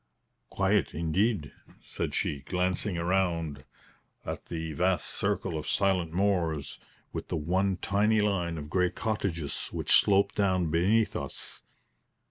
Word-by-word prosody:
"Quiet, 100 +1 +1
indeed!" 85 +2 0 0.3
said - - -4
she, 70 - 0
glancing 90 +5 -1
round 85 -5 0 0.6
at - - -5
the 80 -1 -4
vast 90 +3 +1
circle 95 -5 -1
of 75 - -5
silent 95 -5 +1
moors, 85 -5 0 0.3
with - - -5
the - - -2
one 95 +5 +1
tiny 105 +4 +2
line 90 -5 0
of 75 -1 -6
grey 90 +3 +2
cottages 90 -10 -3
which - - -2
sloped 100 0 +5
down 95 -5 +1
beneath 100 +7 +2
us. - - -4
90 Hz, 125 wpm, -29 LUFS, 80-100 Hz, 0.6 s, sloped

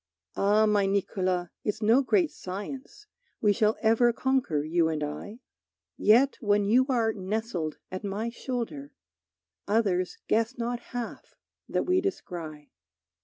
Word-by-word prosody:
Ah, 210 +2 +3
my 205 -2 +3
Niccolo, 185 -2 0
it's 210 - -2
no 230 +5 +5
great 330 +3 +2
science 260 - -7 0.3
We 210 -2 +3
shall 215 +2 +2
ever 230 +2 +4
conquer, 245 - 0
you 165 +1 +2
and 155 -2 -2
I. 205 - -6 0.5
Yet, 250 +6 +4
when 205 -2 +2
you 250 +6 +4
are 230 -4 +2
nestled 195 -5 -3
at 185 +2 -5
my 205 +4 -3
shoulder, 230 - -5 0.7
Others 200 -4 +1
guess 230 +3 +1
not 240 0 -2 0.2
half 240 -2 -6 0.3
that - - 0
we 365 +1 +2
descry. 165 - -5
210 Hz, 130 wpm, -28 LUFS, 185-240 Hz, 0.7 s, no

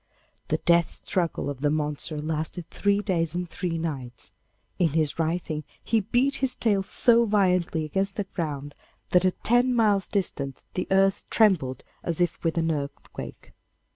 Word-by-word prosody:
The - - +1
death 170 -1 +1
struggle 170 -6 -1
of 140 -2 -5
the 145 - +2
monster 150 +1 -1
lasted 160 +2 -3
three 200 0 +1
days 170 -5 -1
and 180 0 -2
three 170 -1 -3
nights; 135 -7 -5 0.5
in 165 -5 +2
his 155 -1 0
writhing 160 -1 -1 0.2
he 225 - +2
beat 250 +7 +1
his 265 -1 +2
tail 205 -4 +2
so 235 +4 +4
violently 180 -6 +2
against 195 +6 -1
the 205 - -1
ground, 145 -6 -5 0.4
that 180 0 +4
at 185 - -1
ten 245 +2 +3
miles' 210 -4 +3
distance 140 -9 -3
the 180 - -2
earth 195 0 +2
trembled 160 - +2 0.2
as 170 -1 -2
if 175 -1 0
with 165 0 0
an 165 0 +2
earthquake. 140 -2 -6
175 Hz, 160 wpm, -26 LUFS, 155-195 Hz, 0.5 s, so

